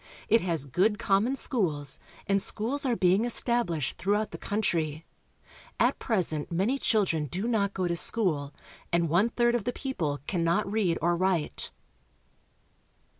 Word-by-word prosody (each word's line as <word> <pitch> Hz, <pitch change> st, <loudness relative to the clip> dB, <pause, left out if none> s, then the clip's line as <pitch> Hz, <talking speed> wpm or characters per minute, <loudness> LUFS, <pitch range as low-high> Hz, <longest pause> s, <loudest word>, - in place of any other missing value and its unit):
It 225 Hz, -, +5 dB
has 165 Hz, -6 st, -1 dB
good 195 Hz, -, +1 dB
common 205 Hz, +8 st, +1 dB
schools, 155 Hz, -, -1 dB, 0.3 s
and 195 Hz, 0 st, +2 dB
schools 260 Hz, +9 st, -1 dB
are 245 Hz, -, +2 dB
being 190 Hz, +1 st, +3 dB
established 235 Hz, -, 0 dB
through 200 Hz, +4 st, +1 dB
out 215 Hz, 0 st, -1 dB
the -, -, -8 dB
country. 165 Hz, -7 st, -1 dB, 0.7 s
At -, -, +2 dB
present 175 Hz, -, -1 dB
many 200 Hz, +11 st, 0 dB
children 190 Hz, -, +1 dB
do 190 Hz, -, -3 dB
not 200 Hz, -4 st, 0 dB
go 185 Hz, -2 st, 0 dB
to 170 Hz, -, -1 dB
school, 155 Hz, -4 st, +1 dB, 0.4 s
and 170 Hz, -1 st, +2 dB
one 185 Hz, +8 st, +3 dB
third 240 Hz, 0 st, +2 dB
of 240 Hz, -3 st, 0 dB
the 245 Hz, -, -2 dB
people 165 Hz, -, -3 dB
cannot 170 Hz, +2 st, +1 dB
read 200 Hz, -6 st, +1 dB
or 175 Hz, +1 st, +3 dB
write. 180 Hz, -3 st, -1 dB
190 Hz, 150 wpm, -28 LUFS, 165-225 Hz, 0.7 s, It